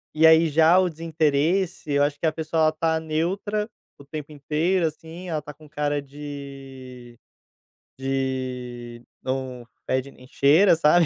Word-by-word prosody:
E 160 +1 +6
aí 160 +1 +6
já 160 +4 +5
o 185 -1 +4
desinteresse, 160 +1 0
eu 140 0 +4
acho 145 0 -1
que 165 - +1
a - - +2
pessoa 160 0 -1
ela 155 - +5
está 160 +1 0
neutra, 190 +7 -1 0.3
o 140 - -14
tempo 150 0 -7
inteiro 155 +5 0
assim, 165 +3 -6
ela 155 -2 -1
está 150 0 -10
com 155 0 -16
cara 145 -1 -1
de 135 -4 -10 0.8
de 125 -3 -3 0.2
não 130 -2 -4 0.2
fede 130 +1 0
e - - -14
nem 125 - -16
cheira, 160 +8 +5
sabe. 165 +2 +5
150 Hz, 155 wpm, -24 LUFS, 135-160 Hz, 0.8 s, E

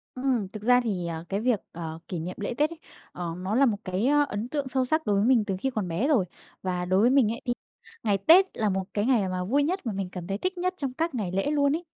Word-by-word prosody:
Ừm, 255 -6 0
thực 210 0 -9
ra 250 +2 +5
thì, 190 -7 -2
ờ, 165 0 -5
cái 195 - -1
việc, 235 -1 +1
ờ, 165 -1 -6
kỷ 175 - -4
niệm 180 +3 -5
lễ 205 - -2
Tết 300 +2 +3
ấy, 335 - -10 0.3
ờ, 175 -2 -4
nó 190 +4 -2
là 275 - +5
một 220 -5 +1
cái, 185 +5 -1
ơ, 290 +1 +4
ấn 210 +4 -4
tượng 285 -1 -2
sâu 260 0 0
sắc 315 +4 0
đối 205 - +2
với 200 +2 +2
mình 240 -4 +4
từ 195 -2 -1
khi 265 - 0
còn 215 -7 -3
bé 175 +11 0
rồi. 260 -12 +3 0.4
Và 180 -1 -2
đối 185 +2 +3
với 235 - +5
mình 260 -5 +4
ấy 230 - -5
thì 245 - +1 0.5
ngày 205 -3 +2
Tết 330 - +7
là 215 -2 0
một 190 0 0
cái 205 0 0
ngày 230 -7 +2
mà 185 0 -2
vui 270 +10 +2
nhất 360 +2 -2
mà 225 - -1
mình 195 -2 -3
cảm 180 -2 -7
thấy 195 0 -2
thích 370 - -2
nhất 365 +1 0
trong 275 -5 -3
các 320 +1 -2
ngày 205 -7 -2
lễ 195 +10 0
luôn 285 -1 +3
ấy. 335 - -4
220 Hz, 290 wpm, -27 LUFS, 190-275 Hz, 0.5 s, Tết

